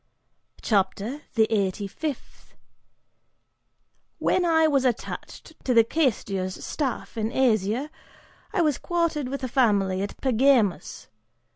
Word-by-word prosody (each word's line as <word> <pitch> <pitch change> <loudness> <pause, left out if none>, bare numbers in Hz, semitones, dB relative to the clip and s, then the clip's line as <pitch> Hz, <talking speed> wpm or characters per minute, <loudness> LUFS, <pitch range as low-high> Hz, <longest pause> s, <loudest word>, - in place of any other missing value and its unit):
CHAPTER 215 +6 0
THE 220 -2 +5
EIGHTY 200 -1 0
FIFTH. 285 +7 -7 1.6
"When 365 - +1
I 320 -1 +4
was 280 -4 +2
attached 250 +5 -4
to 250 - +1
the 230 - +7
Quaestor's 205 - -1
staff, 265 -6 -3
in 220 0 -1
Asia, 240 +2 +1 0.6
I 405 -5 +1
was 300 -4 +1
quartered 335 -5 -1
with 275 0 -5
a - - 0
family 205 -7 +2
at 200 - -5
Pergamus. 250 -6 +2
250 Hz, 115 wpm, -25 LUFS, 205-290 Hz, 1.6 s, the